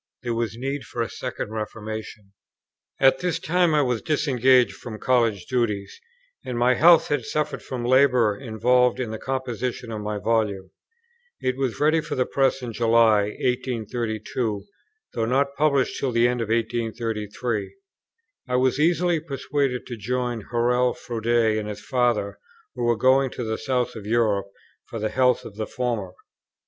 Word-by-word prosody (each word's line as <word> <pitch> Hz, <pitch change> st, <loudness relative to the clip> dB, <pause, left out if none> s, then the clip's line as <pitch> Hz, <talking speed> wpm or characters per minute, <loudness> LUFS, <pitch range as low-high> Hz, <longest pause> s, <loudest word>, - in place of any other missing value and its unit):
There 120 Hz, -1 st, -1 dB
was 115 Hz, -2 st, -2 dB
need 135 Hz, +3 st, -3 dB
of -, -, -3 dB
a -, -, -3 dB
second 125 Hz, -4 st, -5 dB
reformation. 110 Hz, -1 st, -6 dB, 0.7 s
At 135 Hz, 0 st, +5 dB
this 180 Hz, -2 st, -1 dB
time 175 Hz, -1 st, +2 dB
I 150 Hz, -, +4 dB
was 125 Hz, -3 st, -1 dB
disengaged 130 Hz, -5 st, +3 dB
from 110 Hz, -3 st, -8 dB
College 115 Hz, -6 st, +1 dB
duties, 105 Hz, -6 st, -2 dB, 0.4 s
and 125 Hz, -2 st, -4 dB
my 125 Hz, +1 st, +4 dB
health 165 Hz, +5 st, +6 dB
had 145 Hz, -4 st, 0 dB
suffered 150 Hz, +5 st, -2 dB
from 125 Hz, -2 st, -5 dB
the 120 Hz, -, -1 dB
labour 125 Hz, -5 st, +4 dB
involved 125 Hz, +1 st, +2 dB
in 120 Hz, -4 st, -3 dB
the 110 Hz, -, -5 dB
composition 125 Hz, -2 st, -3 dB
of 110 Hz, -1 st, -4 dB
my 105 Hz, 0 st, -3 dB
Volume. 105 Hz, -4 st, -1 dB, 0.7 s
It 130 Hz, -1 st, -1 dB
was 130 Hz, -3 st, -2 dB
ready 155 Hz, +2 st, +3 dB
for -, -, -5 dB
the 125 Hz, -, +1 dB
Press 135 Hz, -1 st, +1 dB
in 120 Hz, -2 st, -5 dB
July, 115 Hz, -2 st, +4 dB, 0.2 s
1832, 115 Hz, -3 st, -2 dB, 0.5 s
though 115 Hz, -, 0 dB
not 140 Hz, +4 st, +1 dB
published 140 Hz, -3 st, +1 dB
till 135 Hz, -, -1 dB
the 120 Hz, 0 st, +3 dB
end 125 Hz, -1 st, -1 dB
of 110 Hz, -, -3 dB
1833. 115 Hz, -1 st, -2 dB, 0.7 s
I 125 Hz, -, 0 dB
was 130 Hz, +2 st, +2 dB
easily 175 Hz, +1 st, +2 dB
persuaded 140 Hz, -3 st, -2 dB
to 120 Hz, -, -7 dB
join 120 Hz, +1 st, -2 dB
Hurrell 125 Hz, +1 st, +2 dB
Froude 115 Hz, -2 st, -6 dB
and 110 Hz, -3 st, +2 dB
his 105 Hz, -, -8 dB
Father, 120 Hz, -5 st, 0 dB, 0.3 s
who -, -, -3 dB
were 120 Hz, -1 st, +2 dB
going 130 Hz, +2 st, +4 dB
to 125 Hz, -, -6 dB
the 110 Hz, -1 st, -3 dB
south 125 Hz, +1 st, -1 dB
of 105 Hz, -2 st, -8 dB
Europe 110 Hz, -3 st, +1 dB, 0.4 s
for -, -, -6 dB
the 110 Hz, 0 st, -1 dB
health 125 Hz, 0 st, +2 dB
of 105 Hz, -, -10 dB
the 110 Hz, -, -3 dB
former. 115 Hz, -7 st, -3 dB
120 Hz, 165 wpm, -24 LUFS, 110-130 Hz, 0.7 s, health